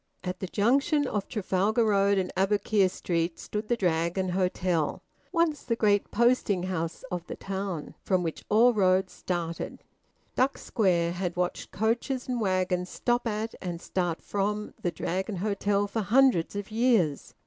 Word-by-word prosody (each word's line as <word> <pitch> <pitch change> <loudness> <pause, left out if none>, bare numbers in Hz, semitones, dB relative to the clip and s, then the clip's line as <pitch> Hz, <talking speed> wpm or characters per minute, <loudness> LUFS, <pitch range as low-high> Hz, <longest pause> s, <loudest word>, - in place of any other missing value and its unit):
At 180 0 -4
the 190 - -4
junction 275 - +2
of 210 -6 -2
Trafalgar 210 +2 +1
Road 200 -1 +3
and 185 -1 -1
Aboukir 200 0 +2
Street 170 -2 -2
stood 210 +1 -5
the 240 - +1
Dragon 175 0 0
Hotel, 180 -3 0 0.3
once 335 -4 +1
the 230 - -1
great 205 -3 +2
posting 235 -6 +2
house 165 -3 -3
of 175 -1 -4
the - - -5
town, 195 -5 -4
from 185 -2 +1
which 165 -2 -4
all 235 +3 +5
roads 185 -2 +2
started. 170 -2 -4 0.5
Duck 265 +2 +2
Square 175 -6 +1
had 180 0 -3
watched 180 0 -2
coaches 235 +5 -1
and 250 -2 -1
waggons 185 -2 0
stop 240 0 0
at 220 +1 -2
and 175 -2 -4
start 175 -2 -2
from 210 +1 -2
the 175 - 0
Dragon 190 +4 -3
Hotel 200 +1 0
for 210 +2 -2
hundreds 225 -4 +3
of 205 +1 -5
years. 220 - +1
195 Hz, 155 wpm, -28 LUFS, 180-220 Hz, 0.5 s, all